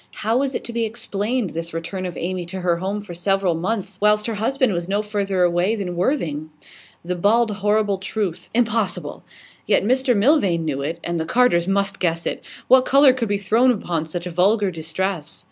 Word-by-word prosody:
How 225 +2 +2
was 275 -1 -1
it - - -3
to 235 - -8
be 235 0 0
explained, 220 -1 -2
this 165 0 -6
return 185 +3 -4
of 175 - -7
Amy 180 +1 -3
to 185 +1 -5
her 175 -1 +1
home 195 +4 -3
for 205 -4 -9
several 190 +1 +1
months, 190 +3 -3
whilst 210 0 +3
her 230 - -2
husband 245 +2 +1
was 175 +1 -3
no 205 +2 0
further 200 -3 0
away 175 +5 +2
than 185 -5 -4
Worthing? 170 - -1 0.6
The 180 - -1
bald, 215 +6 +2
horrible 205 -1 +1
truth 190 -3 -4
impossible! 230 -4 -1 0.4
Yet - - +3
Mr 255 +1 +2
Milvain 200 - +3
knew 140 -3 -2
it, 160 +4 -3
and 170 -1 -2
the 160 - -2
Carters 210 -6 +3
must 195 0 0
guess 170 -2 -1
it. - - -3 0.2
What 260 0 +7
colour 275 0 +6
could 235 -4 -2
be 205 - +1
thrown 220 +6 +3
upon 170 -9 -1
such 175 +2 -5
vulgar 190 +4 +2
distress? 165 0 -4
195 Hz, 195 wpm, -21 LUFS, 175-225 Hz, 0.6 s, What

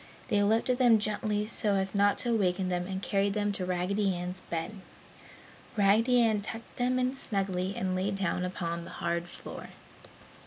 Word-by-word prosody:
They 205 -1 +3
lifted 225 +5 +2
them 240 -3 +6
gently 210 0 -1
so 210 -2 0
as 190 0 0
not 200 0 +3
to 240 - 0
awaken 185 -3 +1
them 180 0 -1
and 190 0 -4
carried 200 0 +1
them 205 -1 +1
to 185 -2 -2
Raggedy 185 +2 0
Ann's 180 +1 -5
bed. 170 +6 -3 1.0
Raggedy 220 +5 +4
Ann 215 -2 +2
tucked 225 +2 -5
them 250 +1 +1
in 255 0 +1
snugly 195 -6 -1
and 185 0 -1
lay 185 +2 0
down 195 -2 -1
upon 170 -2 -3
the - - -10
hard 170 0 -2
floor. - - -9
200 Hz, 170 wpm, -30 LUFS, 185-215 Hz, 1.0 s, them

